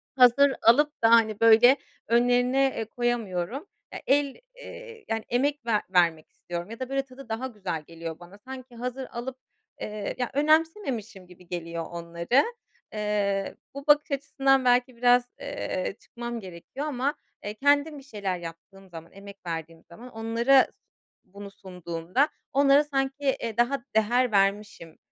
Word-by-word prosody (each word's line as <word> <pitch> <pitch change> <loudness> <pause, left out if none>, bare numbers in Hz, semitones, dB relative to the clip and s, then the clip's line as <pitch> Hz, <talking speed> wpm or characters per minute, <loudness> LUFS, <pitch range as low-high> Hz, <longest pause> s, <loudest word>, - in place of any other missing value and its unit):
hazır 265 +2 +6
alıp 295 +6 +4
da, 225 - +6
hani, 220 -2 +4
böyle 230 +4 +7 0.3
önlerine, 245 +3 +3
eee, 225 - -2
koyamıyorum. 240 - -2 0.3
Ya, - - -6
el, 280 0 +2 0.2
eee, - - -11
hani, 225 0 -1
emek 280 +2 0
ver 220 -3 +2
vermek 170 -4 +2
istiyorum 175 +2 -7
ya 230 - -8
da 260 -1 -4
böyle 275 0 0
tadı 260 -1 -13
daha 225 +4 -2
güzel 190 -9 -5
geliyor 165 0 -8
bana. 175 +3 -14
Sanki 255 +2 -10
hazır 250 +2 -5
alıp, 250 +2 -6 0.4
eee, 210 -1 -4
ya, 250 -1 -2
önemsememişim 285 - 0
gibi 180 0 -17
geliyor 170 -1 -5
onları. 170 +9 +1 0.5
Eee, 205 -2 -1 0.2
bu 280 +1 -9
bakış 295 0 +4
açısından 270 -1 +2
belki 245 0 +3
biraz, 245 +1 +4 0.2
eee, 280 -10 -4
çıkmam 235 0 -6
gerekiyor 190 - -8
ama, 280 -1 -1 0.3
eee, 205 - -4
kendim 285 +5 +2
bir 275 - -11
şeyler 205 -8 -3
yaptığım 175 +3 -11
zaman, 165 -1 -11
emek 200 0 -12
verdiğim 165 -1 -6
zaman 230 +9 -12
onlara 230 +4 +3 0.6
bunu 200 +1 -11
sunduğumda 180 - -2 0.2
onlara 280 +1 +5
sanki, 270 -1 -2 0.2
eee, 230 -2 -4
daha 245 +2 +1
değer 240 +3 +3
vermişim 200 -4 0
235 Hz, 145 wpm, -26 LUFS, 195-270 Hz, 0.6 s, böyle